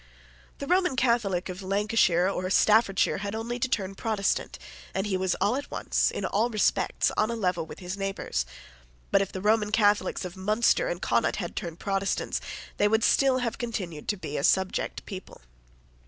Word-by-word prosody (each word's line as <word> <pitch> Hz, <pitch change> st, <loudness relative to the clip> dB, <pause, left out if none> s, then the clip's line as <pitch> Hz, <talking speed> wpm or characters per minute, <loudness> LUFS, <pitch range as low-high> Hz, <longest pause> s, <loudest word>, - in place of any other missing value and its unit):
The 280 Hz, -, -5 dB
Roman 360 Hz, -2 st, +2 dB
Catholic 235 Hz, -8 st, +1 dB
of 185 Hz, +1 st, -6 dB
Lancashire 195 Hz, -2 st, +2 dB
or 185 Hz, -1 st, -2 dB
Staffordshire 210 Hz, -1 st, +3 dB
had 200 Hz, +1 st, -4 dB
only 235 Hz, +2 st, -3 dB
to 260 Hz, -, 0 dB
turn 195 Hz, -5 st, -1 dB
Protestant; 205 Hz, -1 st, -1 dB, 0.4 s
and 190 Hz, +1 st, 0 dB
he 205 Hz, -2 st, -1 dB
was 185 Hz, 0 st, 0 dB
at 240 Hz, +9 st, 0 dB
once, -, -, 0 dB
in -, -, -4 dB
all 225 Hz, +4 st, +1 dB
respects, 215 Hz, -3 st, +1 dB
on 215 Hz, -, +2 dB
a 235 Hz, -, -2 dB
level 180 Hz, -6 st, -1 dB
with -, -, -9 dB
his 180 Hz, +1 st, -5 dB
neighbours: 195 Hz, -, -2 dB, 0.6 s
but, 195 Hz, -, +5 dB
if 195 Hz, -, -2 dB
the 185 Hz, -, -5 dB
Roman 210 Hz, 0 st, +2 dB
Catholics 205 Hz, -3 st, +2 dB
of 180 Hz, -, -7 dB
Munster 215 Hz, -, +2 dB
and -, -, -4 dB
Connaught -, -, +1 dB
had -, -, -5 dB
turned 170 Hz, -2 st, -5 dB
Protestants, 195 Hz, 0 st, -1 dB, 0.4 s
they 205 Hz, -, +4 dB
would 220 Hz, +1 st, +2 dB
still 270 Hz, 0 st, +4 dB
have 230 Hz, -, -3 dB
continued 190 Hz, -, -4 dB
to 205 Hz, -, 0 dB
be 150 Hz, -5 st, -5 dB
a -, -, -2 dB
subject 190 Hz, +3 st, +1 dB
people. 190 Hz, -2 st, -9 dB
200 Hz, 180 wpm, -27 LUFS, 185-225 Hz, 0.6 s, but